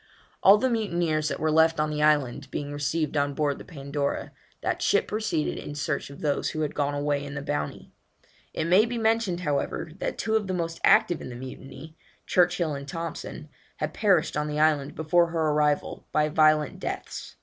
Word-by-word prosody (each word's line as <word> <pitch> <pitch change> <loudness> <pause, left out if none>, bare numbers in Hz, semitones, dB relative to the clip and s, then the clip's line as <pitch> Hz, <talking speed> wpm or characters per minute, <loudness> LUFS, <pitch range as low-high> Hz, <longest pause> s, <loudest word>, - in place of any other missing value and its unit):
All 195 +2 +8
the 260 - +1
mutineers 175 -10 0
that 140 - -3
were 155 0 +1
left 160 0 +4
on 155 0 +1
the 150 0 -2
island 145 -3 +2
being 145 0 -4
received 150 +2 -1
on 145 -1 0
board 145 -2 0
the - - -9
Pandora, 140 -2 -3 0.3
that - - -1
ship 430 +3 +2
proceeded 215 -8 -1
in 145 - -7
search 145 -1 -2
of 140 - -11
those 145 -2 0
who 155 - -3
had 150 -1 -1
gone 145 0 -1
away 145 0 0
in 145 0 -7
the 140 - -3
Bounty. 145 - -4 0.6
It 160 - -2
may 190 +7 +5
be 240 +1 -3
mentioned, 220 -5 +1
however, 145 0 -2
that - - -3
two 220 - 0
of 215 -3 +1
the 185 - -1
most 165 -1 -3
active 175 -3 +4
in - - -7
the 120 - -7
mutiny, 135 +5 -9 0.3
Churchill 175 -3 +2
and 140 0 -6
Thompson, 165 +3 -6 0.3
had - - -3
perished 190 -7 +2
on 150 0 -1
the 150 0 -2
island 150 -2 +2
before 170 +2 +3
her 165 -2 0
arrival, 150 -1 0
by 150 0 +2
violent 155 -1 +3
deaths. - - -6
155 Hz, 195 wpm, -26 LUFS, 145-170 Hz, 0.6 s, All